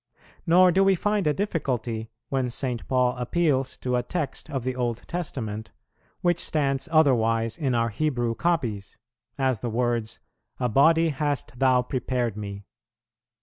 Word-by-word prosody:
Nor 180 Hz, +2 st, +6 dB
do 190 Hz, +3 st, +4 dB
we 195 Hz, 0 st, +4 dB
find 205 Hz, -1 st, 0 dB
a -, -, +4 dB
difficulty, 125 Hz, -, -2 dB, 0.2 s
when 130 Hz, -2 st, 0 dB
St. 125 Hz, -1 st, -3 dB
Paul 125 Hz, -1 st, +2 dB
appeals 135 Hz, 0 st, 0 dB
to 125 Hz, -1 st, -1 dB
a -, -, +1 dB
text 150 Hz, +4 st, -4 dB
of 135 Hz, -4 st, -3 dB
the 130 Hz, 0 st, -2 dB
Old 120 Hz, -2 st, -3 dB
Testament, 110 Hz, -11 st, -4 dB, 0.5 s
which 175 Hz, -1 st, +2 dB
stands 140 Hz, 0 st, 0 dB
otherwise 115 Hz, -7 st, +3 dB
in 135 Hz, -7 st, -1 dB
our 115 Hz, 0 st, +1 dB
Hebrew 120 Hz, -1 st, -1 dB
copies; 115 Hz, -, -1 dB, 0.4 s
as 130 Hz, -4 st, +1 dB
the 120 Hz, -, -3 dB
words, 120 Hz, -1 st, -1 dB, 0.4 s
"A 125 Hz, -, +1 dB
body 160 Hz, +7 st, +4 dB
hast 145 Hz, -2 st, -2 dB
Thou 130 Hz, -2 st, +4 dB
prepared 125 Hz, -3 st, -2 dB
Me." 100 Hz, -1 st, -7 dB
130 Hz, 145 wpm, -25 LUFS, 115-155 Hz, 0.5 s, Nor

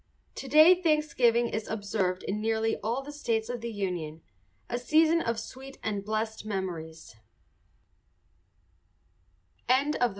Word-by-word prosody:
To 275 Hz, -, -7 dB
day 315 Hz, +6 st, +7 dB
Thanksgiving 255 Hz, -8 st, +2 dB
is 220 Hz, 0 st, -3 dB
observed 200 Hz, -4 st, -2 dB
in 210 Hz, +2 st, -3 dB
nearly 225 Hz, 0 st, +1 dB
all 235 Hz, +6 st, -2 dB
the 290 Hz, -, -8 dB
states 230 Hz, -7 st, -2 dB
of 245 Hz, -1 st, -4 dB
the 235 Hz, 0 st, -4 dB
Union, 175 Hz, -6 st, -4 dB, 0.4 s
a 240 Hz, -, -2 dB
season 315 Hz, +6 st, +3 dB
of 230 Hz, -4 st, -1 dB
sweet 265 Hz, +1 st, -10 dB
and 205 Hz, -3 st, -2 dB
blessed 220 Hz, +1 st, -3 dB
memories. 170 Hz, -, -5 dB
225 Hz, 120 wpm, -28 LUFS, 200-265 Hz, 0.4 s, day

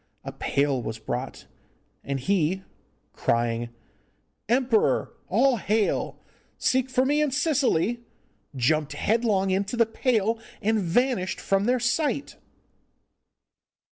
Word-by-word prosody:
A -, -, -6 dB
pail 140 Hz, -2 st, 0 dB
was 110 Hz, -1 st, -5 dB
brought, 120 Hz, +4 st, -5 dB, 0.6 s
and 140 Hz, -1 st, -3 dB
he, 190 Hz, +4 st, 0 dB, 0.5 s
crying 115 Hz, 0 st, 0 dB, 0.8 s
'Emperor, 245 Hz, -2 st, +2 dB
all 270 Hz, -3 st, +3 dB
hail! 210 Hz, +1 st, 0 dB, 0.4 s
seek 260 Hz, 0 st, +1 dB
for 255 Hz, 0 st, +2 dB
me 295 Hz, +2 st, +2 dB
in 300 Hz, -, +2 dB
Sicily,' 255 Hz, -, +1 dB, 0.5 s
jumped 150 Hz, +4 st, +1 dB
headlong 210 Hz, -4 st, +1 dB
into 200 Hz, +5 st, -1 dB
the 230 Hz, -, +5 dB
pail, 225 Hz, -1 st, 0 dB, 0.2 s
and 220 Hz, +1 st, +1 dB
vanished 190 Hz, +1 st, 0 dB
from 195 Hz, +1 st, +1 dB
their 250 Hz, +2 st, +2 dB
sight. 280 Hz, +3 st, -1 dB
215 Hz, 105 wpm, -26 LUFS, 160-250 Hz, 0.8 s, the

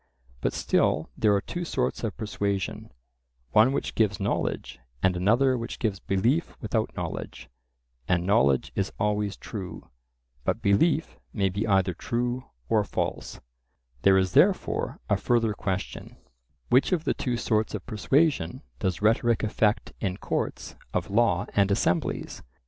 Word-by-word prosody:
But -, -, -1 dB
still -, -, +1 dB
there 105 Hz, -2 st, +3 dB
are 100 Hz, -, +1 dB
two 175 Hz, -, -5 dB
sorts 130 Hz, -8 st, -2 dB
of 110 Hz, -4 st, -3 dB
persuasion: 100 Hz, -, -3 dB, 0.6 s
one 110 Hz, -, +6 dB
which 140 Hz, -, -2 dB
gives 105 Hz, -3 st, +1 dB
knowledge, 100 Hz, -, -2 dB, 0.2 s
and 95 Hz, -1 st, +3 dB
another 120 Hz, +9 st, +3 dB
which 115 Hz, -, -5 dB
gives 105 Hz, -4 st, -1 dB
belief 120 Hz, -, 0 dB
without 110 Hz, 0 st, -2 dB
knowledge; -, -, -6 dB, 0.6 s
and 90 Hz, -1 st, +1 dB
knowledge 70 Hz, -10 st, +3 dB
is 100 Hz, 0 st, -1 dB
always 105 Hz, -1 st, 0 dB
true, 95 Hz, -4 st, -8 dB, 0.5 s
but 95 Hz, -, 0 dB
belief 130 Hz, +10 st, +2 dB
may 100 Hz, -3 st, +1 dB
be 100 Hz, +4 st, -2 dB
either 95 Hz, -3 st, +3 dB
true 120 Hz, +6 st, -2 dB, 0.2 s
or 105 Hz, +5 st, +3 dB
false,—there 60 Hz, +1 st, -2 dB
is 95 Hz, -1 st, +2 dB
therefore -, -, +2 dB
a -, -, +2 dB
further 115 Hz, -3 st, +1 dB
question: 95 Hz, -2 st, -4 dB, 0.5 s
which 130 Hz, +8 st, +4 dB
of 175 Hz, -4 st, +1 dB
the -, -, +1 dB
two 125 Hz, -3 st, -2 dB
sorts 110 Hz, -1 st, 0 dB
of 100 Hz, -, -6 dB
persuasion 130 Hz, -, +1 dB, 0.2 s
does 95 Hz, +1 st, -2 dB
rhetoric 115 Hz, +1 st, +3 dB
effect 105 Hz, 0 st, +1 dB
in 95 Hz, -3 st, -2 dB
courts -, -, -3 dB, 0.2 s
of -, -, -1 dB
law 105 Hz, -4 st, +3 dB
and 100 Hz, -1 st, +3 dB
assemblies? 95 Hz, -4 st, 0 dB
105 Hz, 140 wpm, -27 LUFS, 95-115 Hz, 0.6 s, one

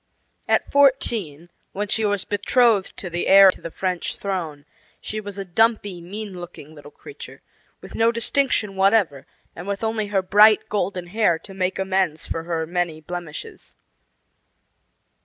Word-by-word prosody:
At -, -, +1 dB
fourteen, 225 Hz, -, +1 dB, 0.2 s
when 205 Hz, +1 st, -3 dB
she 220 Hz, +2 st, 0 dB
was 205 Hz, -2 st, 0 dB
betrothed 205 Hz, 0 st, +2 dB
to 190 Hz, -, -6 dB
the 175 Hz, 0 st, -3 dB
heir 195 Hz, 0 st, +8 dB
to -, -, -15 dB
the 165 Hz, -, -6 dB
French 180 Hz, +1 st, -3 dB
throne, 165 Hz, -7 st, -4 dB, 0.3 s
she 215 Hz, 0 st, -5 dB
was 205 Hz, -1 st, -8 dB
a 195 Hz, -, -5 dB
dumpy, 205 Hz, -1 st, +1 dB
mean 195 Hz, +1 st, -7 dB
looking 160 Hz, -3 st, -11 dB
little 145 Hz, -1 st, -13 dB
creature, 425 Hz, -, -12 dB, 0.4 s
with -, -, -12 dB
no 230 Hz, +1 st, +3 dB
distinction 235 Hz, -3 st, 0 dB
whatever, 190 Hz, -8 st, +2 dB, 0.3 s
and 175 Hz, +3 st, -9 dB
with 200 Hz, +1 st, -3 dB
only 220 Hz, -1 st, -1 dB
her 195 Hz, -2 st, 0 dB
bright 210 Hz, +3 st, +5 dB
golden 190 Hz, -3 st, -2 dB
hair 180 Hz, -2 st, +1 dB
to 195 Hz, +4 st, -14 dB
make 185 Hz, -1 st, -2 dB
amends 190 Hz, -4 st, -1 dB
for 165 Hz, 0 st, -5 dB
her 165 Hz, -2 st, -2 dB
many 175 Hz, -1 st, -2 dB
blemishes. 170 Hz, -1 st, -8 dB
195 Hz, 155 wpm, -22 LUFS, 175-210 Hz, 0.4 s, heir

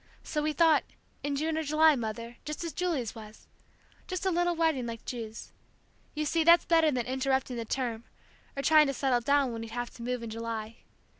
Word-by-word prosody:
So 300 Hz, -, -2 dB
we 305 Hz, +1 st, 0 dB
thought 315 Hz, +1 st, +4 dB, 0.4 s
in 285 Hz, 0 st, -2 dB
June 315 Hz, +2 st, -1 dB
or -, -, -2 dB
July, 305 Hz, +1 st, +5 dB
Mother, 230 Hz, 0 st, -5 dB
just 300 Hz, +2 st, -5 dB
as 335 Hz, -, -4 dB
Julie's 320 Hz, -, -1 dB
was! 215 Hz, -1 st, -12 dB, 0.6 s
Just 370 Hz, 0 st, -4 dB
a 380 Hz, -, +2 dB
little 350 Hz, 0 st, +1 dB
wedding 320 Hz, -7 st, +1 dB
like 230 Hz, -1 st, -7 dB
Ju's. 225 Hz, -3 st, -6 dB, 0.6 s
You 305 Hz, 0 st, -1 dB
see, 325 Hz, +2 st, +1 dB
that's 340 Hz, +1 st, +6 dB
better 325 Hz, -2 st, +4 dB
than 250 Hz, -5 st, -1 dB
interrupting 265 Hz, 0 st, 0 dB
the 230 Hz, -, -4 dB
term, 235 Hz, -2 st, -3 dB, 0.5 s
or 275 Hz, -, -2 dB
trying 305 Hz, -1 st, +6 dB
to 275 Hz, -, -2 dB
settle 255 Hz, -3 st, +1 dB
down, 280 Hz, 0 st, +2 dB
when 230 Hz, -1 st, -5 dB
we'd 225 Hz, -, -7 dB
have 240 Hz, +1 st, -4 dB
to -, -, -13 dB
move 245 Hz, 0 st, -3 dB
in 225 Hz, -, -6 dB
July. 225 Hz, 0 st, -5 dB
270 Hz, 205 wpm, -29 LUFS, 230-315 Hz, 0.6 s, that's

